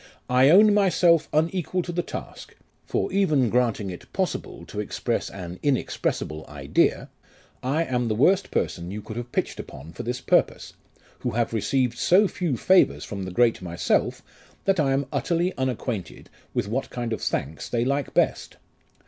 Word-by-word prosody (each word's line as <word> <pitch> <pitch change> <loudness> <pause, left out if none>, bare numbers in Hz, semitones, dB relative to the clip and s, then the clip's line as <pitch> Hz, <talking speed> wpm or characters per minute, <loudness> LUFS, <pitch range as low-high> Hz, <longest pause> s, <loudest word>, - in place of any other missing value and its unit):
I 130 +2 +6
own 205 +5 +7
myself 180 -5 +3
unequal 175 +3 0
to 175 - -5
the 175 0 0
task; - - -8 0.3
for - - -1
even 150 - +2
granting 115 -5 +1
it 90 - -11
possible - - -3
to - - -7
express - - -2
an 90 -2 -8
inexpressible 100 - -1
idea, 70 -2 0 0.5
I 145 +6 +1
am 125 -5 -1
the 110 - 0
worst 185 - +3
person 85 0 -2
you 105 +2 -6
could 110 - -8
have 120 0 -6
pitched - - -2
upon 75 +5 -9
for - - -6
this 125 +2 -3
purpose, 130 - +1 0.5
who - - -2
have 115 0 0
received 120 +3 0
so 195 +4 +5
few 170 -9 -2
favours 90 - +4
from 100 -2 -5
the 95 - -6
great 115 +3 +2
myself, 85 -1 0 0.4
that 195 -2 +2
I 135 -3 +2
am 135 +1 0
utterly 175 +1 0
unacquainted 125 -6 -4 0.2
with - - -1
what 125 +6 -2
kind 120 -2 -3
of - - -4
thanks 75 +4 -3
they 120 0 0
like 140 +1 -1
best. - - +1
125 Hz, 165 wpm, -25 LUFS, 105-165 Hz, 0.5 s, own